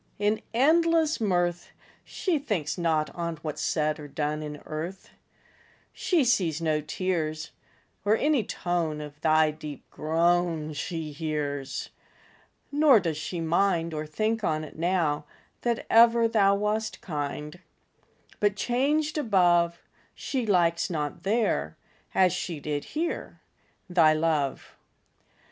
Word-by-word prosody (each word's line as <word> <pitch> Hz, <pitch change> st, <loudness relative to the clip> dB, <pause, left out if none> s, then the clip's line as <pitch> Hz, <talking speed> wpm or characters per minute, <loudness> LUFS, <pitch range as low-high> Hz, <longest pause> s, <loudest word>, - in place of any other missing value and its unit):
In 210 Hz, +1 st, +1 dB
endless 320 Hz, +3 st, +3 dB
mirth, 175 Hz, -4 st, 0 dB, 0.3 s
She 350 Hz, -6 st, -1 dB
thinks 190 Hz, -, -2 dB
not 160 Hz, -3 st, 0 dB
on 170 Hz, -1 st, -3 dB
What's 155 Hz, -2 st, -4 dB
said 155 Hz, -1 st, 0 dB
or 150 Hz, -, -8 dB
done 150 Hz, +1 st, -2 dB
In 150 Hz, -1 st, -6 dB
earth: 165 Hz, +5 st, -6 dB, 0.8 s
She 345 Hz, -6 st, +1 dB
sees 180 Hz, -, +1 dB
no 155 Hz, -2 st, 0 dB
tears, 155 Hz, -1 st, -2 dB, 0.5 s
Or 210 Hz, +3 st, +3 dB
any 290 Hz, -4 st, +2 dB
tone 170 Hz, -5 st, -2 dB
Of 150 Hz, 0 st, -9 dB
thy 155 Hz, -1 st, +4 dB
deep 150 Hz, -2 st, -9 dB
groan 165 Hz, 0 st, +1 dB
She 155 Hz, +1 st, -4 dB
hears; 145 Hz, -3 st, -3 dB, 0.8 s
Nor 290 Hz, -5 st, +6 dB
does 165 Hz, -4 st, -2 dB
she 170 Hz, +3 st, -4 dB
mind, 170 Hz, 0 st, +1 dB
Or 155 Hz, 0 st, -4 dB
think 215 Hz, +8 st, -1 dB
on't 155 Hz, -3 st, -2 dB
now, 160 Hz, -3 st, 0 dB, 0.4 s
That 235 Hz, -1 st, -1 dB
ever 230 Hz, 0 st, +6 dB
thou 200 Hz, -3 st, +4 dB
Wast 215 Hz, +2 st, -2 dB
kind: 150 Hz, 0 st, -5 dB, 0.8 s
But 205 Hz, -1 st, +2 dB
changed 295 Hz, +7 st, 0 dB
above, 175 Hz, -, +3 dB, 0.3 s
She 255 Hz, -5 st, -3 dB
likes 170 Hz, -3 st, +2 dB
not 150 Hz, -5 st, -3 dB
there, 195 Hz, -, 0 dB, 0.4 s
As 185 Hz, -1 st, +4 dB
she 170 Hz, -5 st, -4 dB
did 145 Hz, 0 st, -3 dB
here, 335 Hz, +2 st, -3 dB, 0.5 s
Thy 170 Hz, -4 st, +5 dB
love. 155 Hz, -3 st, -1 dB
170 Hz, 120 wpm, -27 LUFS, 155-210 Hz, 0.8 s, Nor